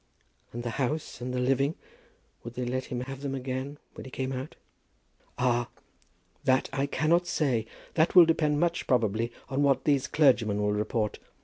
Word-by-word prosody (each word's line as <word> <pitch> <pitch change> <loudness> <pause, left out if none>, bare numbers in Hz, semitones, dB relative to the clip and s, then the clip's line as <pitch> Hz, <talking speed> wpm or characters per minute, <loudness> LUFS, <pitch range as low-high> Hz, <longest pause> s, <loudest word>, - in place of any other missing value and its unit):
"And 120 +1 -5
the 120 - -2
house, 145 +1 -2
and 125 +1 -3
the 125 - -2
living; 135 +4 +1 0.7
would 120 +1 -8
they 125 - -2
let 130 +1 -2
him 125 -1 -4
have 135 +1 -7
them 140 -1 -3
again 130 +2 -4 0.2
when - - -9
he 130 - -9
came 130 +1 -3
out?" 130 +3 -6 0.8
"Ah; 120 -1 +1 0.7
that 130 0 +2
I 135 +1 0
cannot 165 +5 +2
say. 125 -10 0 0.3
That 160 +3 +2
will 175 -2 +10
depend 155 -2 +2
much, 170 +1 0
probably, 115 -1 +1 0.2
on 135 +1 -1
what 135 -2 +3
these 140 -3 +2
clergymen 120 -9 +3
will 105 0 +1
report. 105 +1 -1
130 Hz, 175 wpm, -28 LUFS, 120-145 Hz, 0.8 s, will